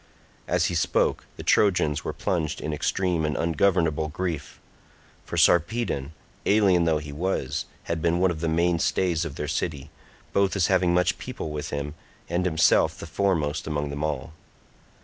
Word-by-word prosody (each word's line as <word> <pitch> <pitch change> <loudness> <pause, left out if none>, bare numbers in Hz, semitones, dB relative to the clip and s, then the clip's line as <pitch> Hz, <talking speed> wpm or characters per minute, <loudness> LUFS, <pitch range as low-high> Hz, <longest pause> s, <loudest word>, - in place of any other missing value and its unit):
As - - +2
he - - -1
spoke 85 - +1
the - - -7
Trojans 80 -7 +2
were - - -2
plunged 85 -6 -2
in 75 - -3
extreme 85 +2 0
and 75 -1 -1
ungovernable 80 -2 +1
grief; 85 0 -4 0.7
for - - -5
Sarpedon, 85 - +2 0.3
alien 95 -5 +4
though 80 -2 +3
he 75 -1 -7
was, 80 -4 -2 0.2
had 85 -1 -3
been 85 +1 +2
one 95 0 +3
of 80 -2 -5
the 85 - 0
main 85 +1 +2
stays 85 -2 +1
of 75 -4 -6
their 75 - -4
city, 75 -1 -3 0.4
both 100 0 +2
as 95 -4 +3
having 90 -1 +3
much 90 +2 +2
people 125 -11 -5
with 75 -1 -4
him, 70 +1 -4 0.4
and 85 +2 0
himself 80 -2 +3
the - - -7
foremost 80 -4 0
among 75 -2 -2
them 70 +1 -4
all. 75 -1 -3
80 Hz, 170 wpm, -25 LUFS, 75-90 Hz, 0.7 s, alien